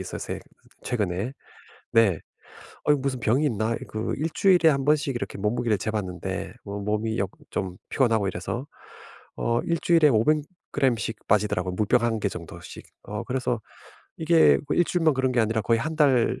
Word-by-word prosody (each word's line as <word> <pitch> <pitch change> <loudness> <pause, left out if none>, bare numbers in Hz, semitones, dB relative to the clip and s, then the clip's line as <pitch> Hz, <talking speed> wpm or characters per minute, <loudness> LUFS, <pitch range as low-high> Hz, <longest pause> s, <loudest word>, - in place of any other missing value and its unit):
있었어요 - - -5 0.4
최근에. 105 +1 -2 0.6
네. 110 -8 +4 0.6
어 150 - +4
이 - - +5
무슨 130 -2 -2
병이 125 +7 +2
있나? 110 -2 0
그 110 +1 -3
1 160 +3 -1
주일에 180 -4 +5
1 135 -3 +1
번씩 145 -2 +2
이렇게 120 - -5
몸무게를 110 +1 0
재봤는데 95 -4 -4
어 100 0 -5
몸이 105 +2 -1
역 95 -1 -1 0.2
좀 90 -1 -3
피곤하고 115 -6 +2
이래서 105 +9 -4 0.7
어 120 0 0
1 170 -2 0
주일에 165 -3 +5
500 135 +5 +3 0.3
그램씩 115 -4 0
빠지더라고요 95 -3 +1
물병 110 +4 +2
1 115 -2 +1
개 - - +1
정도씩. - - -9 0.2
어 105 0 -5
그래서 125 -3 -1 0.6
이게 160 0 +5
뭐 - - +1
1 175 - +5
주일만 165 -3 +2
그런 130 -1 +1
게 120 - +3
아니라 110 0 +1
거의 115 -1 +2
1 155 +4 -3
달 135 -6 +3
115 Hz, 305 characters per minute, -25 LUFS, 105-140 Hz, 0.7 s, 이